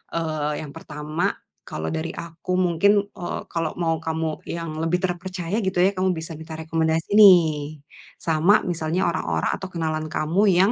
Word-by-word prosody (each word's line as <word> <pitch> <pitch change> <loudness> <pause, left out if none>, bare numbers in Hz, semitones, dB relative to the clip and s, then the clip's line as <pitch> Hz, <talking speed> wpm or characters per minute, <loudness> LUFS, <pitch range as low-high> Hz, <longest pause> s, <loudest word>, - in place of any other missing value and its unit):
eee, 155 -2 -1
yang 150 -2 -8
pertama, 150 +3 -2 0.3
kalau 80 +1 -4
dari 160 +1 -3
aku 170 +2 -6
mungkin, 185 +3 +4
eee, 175 - -5
kalau 165 -2 -2
mau 165 -2 +1
kamu 160 -1 -3
yang 165 -2 -4
lebih 165 +2 +1
terpercaya 180 +1 -2
gitu 190 -2 -2
ya, 190 +2 +5
kamu 185 0 +2
bisa 160 0 -6
minta 160 +1 -9
rekomendasi 160 +1 -1
nih, 155 -7 +6 0.4
sama 165 +6 +4
misalnya 170 +1 -1
orang-orang 80 - -1
atau 190 - -6
kenalan 155 -2 -2
kamu 160 +5 +1
yang, 190 +4 +4
165 Hz, 155 wpm, -23 LUFS, 155-180 Hz, 0.4 s, nih